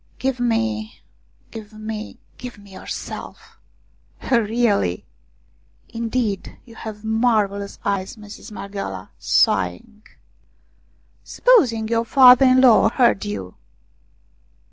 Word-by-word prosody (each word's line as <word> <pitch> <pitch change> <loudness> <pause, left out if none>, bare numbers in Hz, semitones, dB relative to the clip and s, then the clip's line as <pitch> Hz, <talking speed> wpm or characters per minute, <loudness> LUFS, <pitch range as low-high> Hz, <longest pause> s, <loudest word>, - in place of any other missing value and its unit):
" - - -35
Give 265 -2 0
me 225 -2 -1 0.5
give 220 -2 -10
me 215 0 -7 0.2
give 250 -3 -8
me 200 -1 -16
yourself." 185 - -8 0.3
" - - -15
Really 220 - +1 0.3
" - - -38
" - - -38
Indeed, 230 -3 -3
you 235 - -15
have 220 -1 -9
marvellous 220 -3 0
eyes, 195 +1 -2
Mistress 210 +2 -11
Marghioala! 195 - -7
" - - -38 0.2
sighing. 95 - 0 0.6
" - - -40 0.5
Supposing 250 - +2
your 230 0 0
father 255 +1 +7
in 255 0 +5
law 245 -5 +6
heard 235 -4 +2
you 95 -3 -6
220 Hz, 120 wpm, -21 LUFS, 200-235 Hz, 0.6 s, father